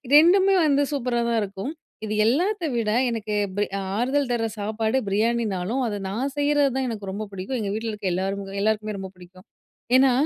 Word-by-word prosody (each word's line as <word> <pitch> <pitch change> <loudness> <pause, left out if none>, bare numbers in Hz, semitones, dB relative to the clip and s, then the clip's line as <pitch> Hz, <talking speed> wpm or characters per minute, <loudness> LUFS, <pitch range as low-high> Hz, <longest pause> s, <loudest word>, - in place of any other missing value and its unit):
ரெண்டுமே 380 +5 +6
வந்து 285 -1 +3
சூப்பரா 245 -3 0
தான் 230 -1 +2
இருக்கும். 200 +8 -5 0.3
இது 215 - -3
எல்லாத்த 355 - +1
விட, 225 -2 0 0.2
எனக்கு 220 -2 -3 0.2
பி 205 - +3 0.3
ஆறுதல் 265 +3 +1
தர்ற 225 -1 +1
சாப்பாடு 220 +3 0
பிரியாணினாலும், 220 +1 0
அத 205 -2 -3
நான் 255 +8 -2
செய்றது 290 -1 +3
தான் 265 -1 0
எனக்கு 210 -4 -5
ரொம்ப 205 +3 -4
பிடிக்கும். 195 +7 -3
எங்க 200 - -2
வீட்ல 225 +1 -3
இருக்க 210 -2 -4
எல்லாரு 195 +2 -3
எல்லாருக்குமே 215 -1 0
ரொம்ப 190 0 -6
பிடிக்கும். 185 +1 -16 0.5
ஏனா, 260 0 +6
225 Hz, 170 wpm, -24 LUFS, 200-265 Hz, 0.5 s, ரெண்டுமே